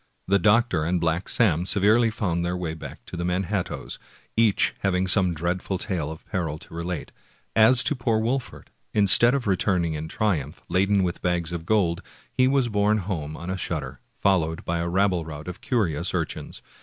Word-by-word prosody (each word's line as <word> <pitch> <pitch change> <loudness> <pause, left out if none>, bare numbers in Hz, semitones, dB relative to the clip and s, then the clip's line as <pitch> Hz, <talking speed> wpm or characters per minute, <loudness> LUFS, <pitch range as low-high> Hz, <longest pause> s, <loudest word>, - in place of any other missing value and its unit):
The 100 +1 +3
doctor 105 -4 +3
and 90 +3 0
Black 85 +2 -1
Sam 90 -8 +2
severally 105 +5 +3
found 90 -6 -1
their 90 +1 -1
way 85 -3 -3
back 80 - -10
to - - -8
the 85 - -3
Manhat 90 +1 -1
toes, - - -7 0.4
each 110 -3 +3
having 95 -1 +1
some 95 -2 +2
dreadful 90 +4 -2
tale 90 -6 -3
of 80 0 -9
peril 80 -5 -3
to 95 +2 -14
relate. 85 -1 -4 0.4
As 115 +3 +6
to - - +2
poor 120 -3 0
Wolfert, 125 +3 -3 0.2
instead 110 +5 +5
of 135 - -2
returning 90 -4 +1
in 75 +1 -4
triumph, 90 - -2
laden 100 +1 +2
with 90 -1 -2
bags 90 -2 -1
of 85 -1 -5
gold, 90 -6 +2 0.3
he 130 - +3
was 135 -2 +2
borne 105 -1 +2
home 85 -7 -4
on 85 +2 -5
a 95 - -2
shutter, - - -4 0.2
fol 95 -2 +3
lowed 80 0 -4
by 85 0 -1
a 85 +1 -1
rabble 95 -1 +2
rout 75 -1 -8
^ - - -16
of 90 +1 -7
curious 100 - 0
urchins. - - -4
90 Hz, 195 wpm, -25 LUFS, 85-105 Hz, 0.4 s, As